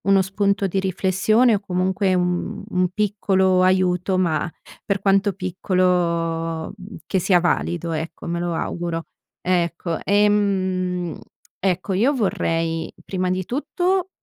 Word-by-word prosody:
Uno 195 Hz, -1 st, +4 dB
spunto 200 Hz, +1 st, 0 dB
di 195 Hz, 0 st, 0 dB
riflessione 195 Hz, +5 st, +2 dB
o, 205 Hz, -, +2 dB
comunque, 185 Hz, 0 st, 0 dB
un 180 Hz, -1 st, -1 dB
un 180 Hz, 0 st, +1 dB
piccolo 190 Hz, -2 st, +2 dB
aiuto, 185 Hz, 0 st, +2 dB
ma 175 Hz, -2 st, +1 dB, 0.3 s
per 200 Hz, -1 st, -1 dB
quanto 195 Hz, +1 st, +2 dB
piccolo 170 Hz, -3 st, 0 dB, 0.3 s
che 190 Hz, -, 0 dB
sia 180 Hz, 0 st, +4 dB
valido, 170 Hz, -1 st, -1 dB
ecco, 160 Hz, +1 st, -5 dB
me 170 Hz, 0 st, -2 dB
lo 175 Hz, 0 st, -2 dB
auguro. 170 Hz, 0 st, -3 dB, 0.4 s
Ecco 170 Hz, -2 st, -1 dB
ehm, 190 Hz, -4 st, +1 dB, 0.4 s
ecco, 190 Hz, +1 st, 0 dB
io 235 Hz, +10 st, +3 dB
vorrei 165 Hz, -7 st, -1 dB
prima 185 Hz, -1 st, -1 dB
di 185 Hz, 0 st, -1 dB
tutto 360 Hz, -, -1 dB
185 Hz, 120 wpm, -22 LUFS, 175-195 Hz, 0.4 s, Uno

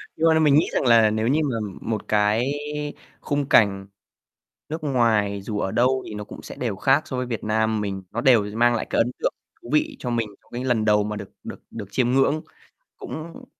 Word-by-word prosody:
Nhưng 165 Hz, +1 st, +2 dB
mà 160 Hz, -, +5 dB
là 160 Hz, -, +3 dB
mình 150 Hz, -3 st, +5 dB
nghĩ 155 Hz, -, +4 dB
rằng -, -, 0 dB
là 115 Hz, -2 st, +6 dB
nếu 110 Hz, +1 st, 0 dB
như 150 Hz, +4 st, +2 dB
mà 135 Hz, -5 st, -1 dB, 0.3 s
một 110 Hz, -2 st, -3 dB
cái 105 Hz, +5 st, +2 dB, 0.7 s
khung 145 Hz, -1 st, -2 dB
cảnh 100 Hz, -2 st, +4 dB, 0.8 s
nước 155 Hz, +1 st, -5 dB
ngoài 110 Hz, -7 st, +1 dB
dù 105 Hz, 0 st, -4 dB
ở 95 Hz, -, -1 dB
đâu 130 Hz, +2 st, +2 dB
thì -, -, -7 dB
nó 105 Hz, 0 st, -5 dB
cũng -, -, -11 dB
sẽ -, -, -9 dB
đều 115 Hz, -6 st, -2 dB
khác 135 Hz, +9 st, +3 dB
so 130 Hz, -, -4 dB
với 125 Hz, -, -2 dB
Việt 115 Hz, -3 st, -4 dB
Nam 110 Hz, 0 st, +1 dB
mình, 95 Hz, -2 st, -3 dB
nó 115 Hz, -, -3 dB
đều 120 Hz, -3 st, +5 dB
mang 120 Hz, +1 st, +3 dB
lại 110 Hz, -, -2 dB
cái -, -, 0 dB
ấn 120 Hz, -, +2 dB
tượng -, -, 0 dB, 0.3 s
thú 120 Hz, -, -10 dB
vị 150 Hz, -, +1 dB
cho 125 Hz, -, -4 dB
mình 115 Hz, -2 st, -1 dB
trong -, -, -29 dB
cái 125 Hz, +2 st, -4 dB
lần 120 Hz, -4 st, +1 dB
đầu 105 Hz, -1 st, +3 dB
mà 105 Hz, 0 st, -4 dB
được 100 Hz, -2 st, -8 dB
được -, -, -8 dB
được 105 Hz, -4 st, -7 dB
chiêm 125 Hz, +1 st, +1 dB
ngưỡng, 140 Hz, +4 st, +2 dB, 0.5 s
cũng 165 Hz, +11 st, -8 dB
115 Hz, 230 wpm, -23 LUFS, 105-135 Hz, 0.8 s, là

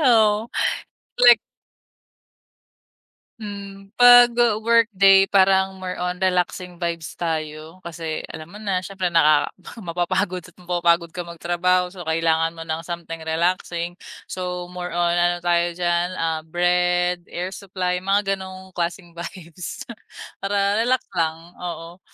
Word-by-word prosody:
Oo 220 Hz, -5 st, +4 dB, 0.8 s
like 240 Hz, -2 st, +9 dB, 2.0 s
Hmm, 200 Hz, -1 st, -9 dB
'pag 245 Hz, 0 st, +9 dB
w 230 Hz, -2 st, +1 dB
workday 195 Hz, -4 st, +5 dB
parang 190 Hz, -1 st, +3 dB
more 185 Hz, -1 st, -5 dB
on 180 Hz, 0 st, -2 dB
relaxing 180 Hz, -1 st, -1 dB
vibes 170 Hz, -2 st, -3 dB
tayo 160 Hz, +1 st, -4 dB
kasi 165 Hz, -2 st, -5 dB
alam 155 Hz, 0 st, -9 dB
mo 195 Hz, -, -12 dB
na 200 Hz, -3 st, -1 dB
siyempre 185 Hz, -1 st, -3 dB
nakaka 155 Hz, -3 st, +4 dB, 0.3 s
mapapagod 175 Hz, +1 st, -1 dB
at 180 Hz, 0 st, -17 dB
mapapagod 175 Hz, -2 st, +1 dB
ka 180 Hz, -, -5 dB
magtrabaho 175 Hz, +1 st, 0 dB
so 185 Hz, -, -11 dB
kailangan 165 Hz, 0 st, +1 dB
mo 165 Hz, -, -7 dB
ng 160 Hz, 0 st, -3 dB
something 170 Hz, -1 st, -6 dB
relaxing, 170 Hz, +1 st, -1 dB, 0.3 s
so 180 Hz, -1 st, -4 dB
more 180 Hz, 0 st, -5 dB
on 175 Hz, 0 st, +1 dB
ano 175 Hz, 0 st, +2 dB
tayo 175 Hz, 0 st, +2 dB
diyan, 175 Hz, 0 st, +1 dB
ah, 160 Hz, -1 st, -1 dB
Bread, 175 Hz, +1 st, +1 dB
Air 180 Hz, +2 st, -4 dB
Supply 180 Hz, -2 st, -3 dB
mga 195 Hz, +1 st, +1 dB
ganong 190 Hz, 0 st, -10 dB
klaseng 175 Hz, 0 st, -4 dB
vibes 170 Hz, 0 st, -8 dB, 0.6 s
para 200 Hz, +1 st, +1 dB
relax 255 Hz, +2 st, +1 dB
lang 165 Hz, -3 st, 0 dB, 0.2 s
oo. 175 Hz, 0 st, -7 dB
180 Hz, 125 wpm, -22 LUFS, 170-195 Hz, 2.0 s, like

